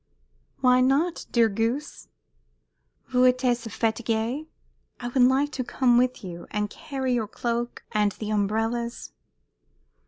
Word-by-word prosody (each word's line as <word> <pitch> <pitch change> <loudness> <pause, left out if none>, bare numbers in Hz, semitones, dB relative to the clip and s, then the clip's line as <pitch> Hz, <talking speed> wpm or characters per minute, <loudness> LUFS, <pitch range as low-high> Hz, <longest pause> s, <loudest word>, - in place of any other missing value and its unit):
"Why 250 -1 +5
not, 290 +7 +1
dear 235 -2 +4
goose?" 230 +8 -2 1.0
"Vous 255 0 +4
êtes 245 -2 -1
fatiguée. 225 +6 -1 0.5
I 245 - -4
would 255 +1 +1
like 265 +4 +4
to 260 - -3
come 245 0 +3
with 250 -2 0
you, 175 -2 -8
and 210 -1 -2
carry 265 -3 -3
your 230 -3 0
cloak 235 +2 -3
and 210 -1 +2
the 215 +2 -5
umbrellas." 225 +3 -1
240 Hz, 125 wpm, -26 LUFS, 225-255 Hz, 1.0 s, Why